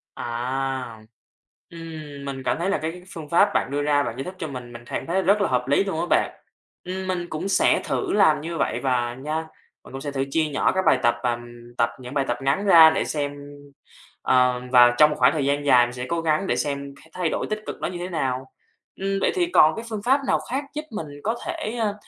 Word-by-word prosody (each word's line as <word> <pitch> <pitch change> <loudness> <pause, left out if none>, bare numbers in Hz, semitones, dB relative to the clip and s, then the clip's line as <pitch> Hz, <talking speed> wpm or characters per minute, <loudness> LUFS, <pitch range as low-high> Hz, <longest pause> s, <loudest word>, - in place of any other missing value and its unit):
À. 125 -1 -3 0.7
Ừm, 155 -4 -9
mình 135 -1 -5
cảm - - +1
thấy 180 +3 0
là 200 - +1
cái 165 +3 -5
phương 155 -3 -8
pháp 185 +5 +4
bạn - - 0
đưa 145 +1 -1
ra 145 -1 +2
bạn 115 - -4
giải 135 - -3
thích 185 +4 -7
cho 160 - -3
mình, 125 -4 -8
mình 120 0 -10
cảm - - -4
thấy 185 +3 +1
rất 200 +3 +3
là 200 - +2
hợp 125 -1 0
lý 145 +7 +3
luôn 195 -5 -3
á - - 0
bạn. - - +2 0.5
Ừm, 185 +1 -5
mình 180 -2 -2
cũng 155 +5 -4
sẽ - - +3
thử 400 - -2
làm 195 -8 +4
như 165 +2 -5
vậy - - 0
và 120 -3 0
nha. 150 +4 -4 0.5
Mình - - -14
cũng 135 - -6
sẽ 145 0 -4
thử 135 -1 -1
chia 160 +2 +2
nhỏ 145 -3 +1
các 190 0 -1
bài 130 - +4
tập 120 0 +4
và, 125 - +2
ừm, 120 0 -11
tập 115 - +3
những 125 +1 -9
bài 140 -2 +1
tập 120 - -1
ngắn 140 +10 0
ra 165 -5 +9
để 160 - 0
xem, 145 -2 -2 0.9
ờ, 125 -1 +3
và 120 -1 +7
trong 150 +2 +7
một 150 - -2
khoảng - - +5
thời 150 -4 -1
gian 145 +1 0
dài 125 -3 +6
mình 120 - -8
sẽ 125 0 -5
cố 170 -1 -1
gắng 160 +3 +1
để - - +1
xem 140 -1 -3
c - - -19
thay 180 -3 -1
đổi - - -2
tích 215 0 -2
cực - - -4
nó - - -1
như 175 - -5
thế 175 +1 -5
nào. 135 -6 -2 0.6
Ừm, 195 0 0
vậy - - +2
thì 360 -2 +2
còn 160 - +5
cái 225 - -6
phương 215 -2 -5
pháp 265 +3 +4
nào - - +2
khác 270 +3 -1
giúp 300 - -3
mình 185 -8 -5 0.2
có 225 +3 0
thể, 215 +3 -4
ơ, 215 -3 0
150 Hz, 255 wpm, -24 LUFS, 130-180 Hz, 0.9 s, ra